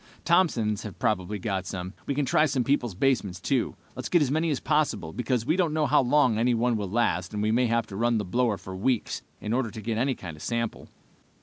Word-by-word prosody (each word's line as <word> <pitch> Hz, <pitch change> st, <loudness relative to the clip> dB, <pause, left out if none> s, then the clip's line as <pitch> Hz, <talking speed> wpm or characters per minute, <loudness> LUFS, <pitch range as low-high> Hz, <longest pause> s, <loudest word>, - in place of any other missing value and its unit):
Thompson's 125 Hz, -, +2 dB
have 105 Hz, -, -8 dB
probably 105 Hz, 0 st, 0 dB
got 95 Hz, -1 st, -3 dB
some. 90 Hz, 0 st, -5 dB
We 140 Hz, -, -1 dB
can 145 Hz, 0 st, +1 dB
try 155 Hz, +4 st, +3 dB
people's 130 Hz, -5 st, 0 dB
basements, 100 Hz, -6 st, +1 dB
too. 125 Hz, +6 st, 0 dB, 0.2 s
Let's 130 Hz, -, -5 dB
get 175 Hz, -4 st, +4 dB
as 135 Hz, -, -1 dB
many 160 Hz, +2 st, +1 dB
as 145 Hz, -, 0 dB
possible, 130 Hz, -, 0 dB
because 125 Hz, -2 st, -1 dB
we 155 Hz, +5 st, +2 dB
don't 170 Hz, -5 st, +1 dB
know 155 Hz, -1 st, +2 dB
how 145 Hz, 0 st, +4 dB
long 125 Hz, -4 st, +3 dB
any 120 Hz, +1 st, +3 dB
one 120 Hz, +1 st, +1 dB
will 100 Hz, -3 st, -3 dB
last, 95 Hz, -3 st, 0 dB
and 105 Hz, -, -1 dB
we 110 Hz, -, +2 dB
may 125 Hz, +2 st, +3 dB
have 115 Hz, 0 st, +1 dB
to 100 Hz, -, -9 dB
run 120 Hz, +2 st, +2 dB
the 105 Hz, -, -2 dB
blower 115 Hz, +2 st, +1 dB
for 95 Hz, 0 st, -8 dB
weeks, 115 Hz, +4 st, -1 dB, 0.2 s
in 105 Hz, -, -3 dB
order 125 Hz, -2 st, 0 dB
to 110 Hz, -, -8 dB
get 110 Hz, +1 st, -2 dB
any 130 Hz, +1 st, +1 dB
kind 85 Hz, -4 st, -8 dB
of 75 Hz, -, -14 dB
sample." 115 Hz, -1 st, -3 dB
115 Hz, 235 wpm, -27 LUFS, 105-135 Hz, 0.2 s, get